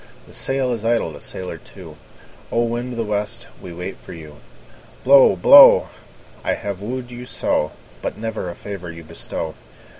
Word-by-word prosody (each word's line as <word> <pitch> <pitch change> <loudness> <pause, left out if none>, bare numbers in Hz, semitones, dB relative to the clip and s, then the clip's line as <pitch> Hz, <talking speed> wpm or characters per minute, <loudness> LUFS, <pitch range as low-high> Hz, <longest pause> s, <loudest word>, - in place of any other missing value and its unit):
The - - -17
sail 135 -1 -1
is 115 -2 -5
idle, 115 -7 +1
the 75 - -11
sailor 90 -1 -6
too; - - -13 0.6
O! 120 - +2
wind 120 +2 -3
of - - -8
the 115 - 0
west, 105 -1 -3 0.2
we 90 - -9
wait 90 +3 -6
for - - -11
you. 75 -3 -11 0.7
Blow, 135 -5 +7
blow! 90 - +8 0.5
I - - 0
have 100 -2 -6
wooed 125 +3 -5
you 125 +1 -9
so, 75 -9 -1 0.3
But - - -4
never 110 -4 -4
a 85 - -7
favour 95 -4 -7
you 85 0 -11
bestow. 80 0 -6
105 Hz, 175 wpm, -21 LUFS, 90-120 Hz, 0.7 s, blow